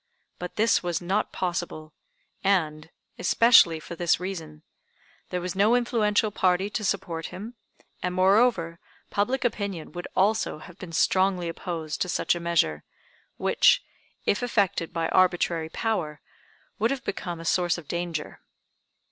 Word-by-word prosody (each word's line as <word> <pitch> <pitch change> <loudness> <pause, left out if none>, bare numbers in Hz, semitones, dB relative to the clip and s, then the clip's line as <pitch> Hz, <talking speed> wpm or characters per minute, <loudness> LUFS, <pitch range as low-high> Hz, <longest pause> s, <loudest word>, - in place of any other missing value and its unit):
But 180 0 -6
this 225 +2 +3
was 175 -2 -1
not 190 +4 -1
possible, 175 -4 -4 0.5
and, 165 -5 +1 0.3
especially 180 -5 +5
for 170 - -8
this 170 -1 +2
reason: 165 -5 -6 0.7
There 180 - -2
was 180 0 -4
no 210 +5 +4
influential 220 -3 +1
party 190 0 +1
to 215 - -3
support 180 -5 -2
him, 215 +6 -8 0.5
and, 180 0 -2
moreover, 185 -3 +3 0.3
public 250 +6 0
opinion 200 -8 -3
would 175 0 -6
also 210 -2 +2
have 175 +4 -13
been 180 -3 -8
strongly 185 +2 +2
opposed 165 -2 -5
to 180 - 0
such - - +1
a 175 - -4
measure, 165 - +1 0.5
which, - - +4 0.4
if 205 - +1
effected 205 -8 0
by 165 -1 -1
arbitrary 175 -3 +2
power, 160 -8 -2 0.6
would 225 +2 +2
have 275 -2 -3
become 175 -3 -4
a 165 - -8
source 175 +1 +2
of 165 -4 -10
danger. 170 -2 -4
180 Hz, 140 wpm, -26 LUFS, 165-205 Hz, 0.7 s, especially